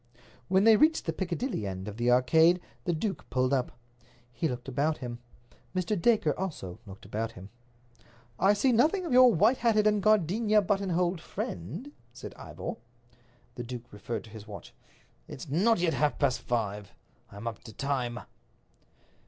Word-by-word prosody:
When 190 +1 +3
they 220 -1 +7
reached 315 +5 +3
the 165 - -1
Piccadilly 175 - -3
end 95 +1 -5
of 105 0 -7
the 120 +1 +1
Arcade 160 +8 +5 0.3
the 175 - +1
duke 190 +5 -3
pulled 130 +2 +1
up. 130 -2 0 0.6
He 120 +7 -1
looked 125 -2 -5
about 145 +4 0
him. 120 -1 -6 0.6
Mr. 185 +3 0
Dacre 190 -5 +2
also 145 - -5
looked 95 0 -11
about 110 +3 -3
him. 95 +2 -11 0.9
"I 195 +3 +5
see 250 +6 +2
nothing 315 - +3
of 325 - -2
your 255 -1 +8
white 220 +7 +3
hatted 220 -3 +2
and 210 -1 +3
gardenia 215 +1 +3
buttonholed 180 -3 0
friend," 145 - -6 0.2
said - - -9
Ivor. 230 - -7 0.8
The 120 - -6
duke 120 -1 -8
referred 105 0 -5
to 110 - -14
his 110 -1 -10
watch. 105 -1 -10 0.5
"It's - - -8
not 200 +11 +3
yet 170 -2 +1
half 150 0 +1
past 140 -4 +1
five. 105 -4 -3 0.4
I'm 100 +3 -9
up 115 -3 -6
to 115 - -9
time." 125 -1 -2
160 Hz, 160 wpm, -29 LUFS, -, 0.9 s, your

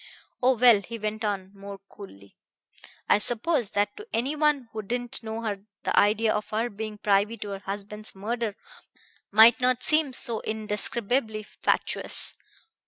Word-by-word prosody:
Oh, 255 0 +3
well!" 235 -3 +6
he 230 +4 -8
went 215 0 -4
on 195 -3 -3
more 200 0 -9
coolly, 100 - -14 0.7
"I - - +4
suppose 240 - 0
that 205 0 +1
to 425 +1 -10
any 260 +6 -1
one 300 -4 +1
who 220 - -4
didn't 245 +4 -4
know 225 0 -6
her 205 -2 -4 0.2
the - - -1
idea 215 +2 +3
of 210 0 -4
her 225 +3 -2
being 215 +1 -6
privy 205 +2 +1
to 205 - -7
her 195 -1 -5
husband's 205 +2 -5
murder 220 +1 -3 0.8
might 225 +4 +7
not 250 0 +2
seem 305 -2 +3
so 235 -3 0
indescribably 220 +1 -1
fatuous. - - +1
220 Hz, 155 wpm, -26 LUFS, 205-240 Hz, 0.8 s, might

